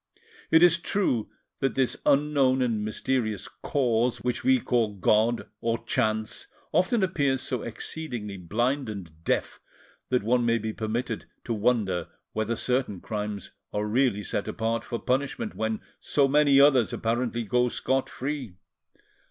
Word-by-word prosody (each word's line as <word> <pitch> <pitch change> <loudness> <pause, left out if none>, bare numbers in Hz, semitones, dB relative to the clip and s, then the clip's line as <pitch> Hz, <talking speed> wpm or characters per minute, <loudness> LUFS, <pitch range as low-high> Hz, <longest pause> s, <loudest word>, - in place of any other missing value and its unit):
It 160 +1 +6
is 170 -1 +6
true 170 - 0 0.3
that 135 - 0
this 130 -2 +1
unknown 140 -3 +3
and 115 -4 0
mysterious 110 -1 -1
Cause 120 -3 0
which 125 -1 -1
we 260 0 +4
call 115 - 0
"God" 110 +4 +2
or 115 0 0
"Chance" 110 0 -1 0.2
often 185 +6 +2
appears 140 -8 +1
so 125 - -2
exceedingly 115 -3 -5
blind 120 - -1
and 85 -6 -8
deaf - - -1 0.5
that 125 -4 +1
one 120 +3 +2
may 115 0 +3
be 110 0 -3
permitted 110 +3 -3 0.2
to 120 - -2
wonder 105 -6 +1 0.3
whether 110 +2 -1
certain 125 -5 -1
crimes 105 0 -4 0.2
are 105 0 -1
really 110 -2 +1
set 100 - -2
apart 115 0 -1
for 120 - -4
punishment, 140 - -1
when 110 0 -2 0.2
so 140 -2 +2
many 140 0 +5
others 135 -5 +5
apparently 120 +1 -1
go 125 +3 +2
scot 130 +2 0
free. 135 -7 -4
120 Hz, 145 wpm, -27 LUFS, 110-135 Hz, 0.5 s, It